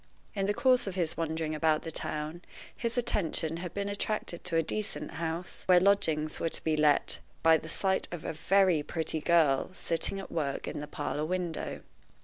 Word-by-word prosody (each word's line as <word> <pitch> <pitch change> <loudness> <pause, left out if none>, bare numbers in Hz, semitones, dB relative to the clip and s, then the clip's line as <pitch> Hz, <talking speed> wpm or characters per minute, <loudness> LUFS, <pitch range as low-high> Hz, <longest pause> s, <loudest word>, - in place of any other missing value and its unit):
In 195 -3 -1
the 205 - +2
course 255 -2 +3
of 190 - -3
his 170 -4 0
wandering 160 -1 -2
about 155 0 +2
the 165 - -5
town, 155 +2 -4 0.3
his 235 +1 -2
attention 165 -8 0
had 175 0 -5
been 200 0 -3
attracted 200 -3 -2
to 175 -2 0
a 165 - +4
decent 210 +6 -3
house, 165 +1 -4
where 180 -1 +7
lodgings 165 -6 +2
were 165 - 0
to - - -4
be 160 -1 +2
let, 150 -1 +3 0.2
by 165 0 +7
the 160 - -9
sight 190 +3 +1
of 175 -3 -6
a - - -2
very 185 0 +3
pretty 160 +1 -2
girl 155 -5 +3
sitting 180 +2 -2
at 195 - -8
work 145 -4 -2
at - - -4
the 150 - -5
parlor 145 0 -3
window. 175 0 -3
165 Hz, 190 wpm, -30 LUFS, 155-190 Hz, 0.3 s, where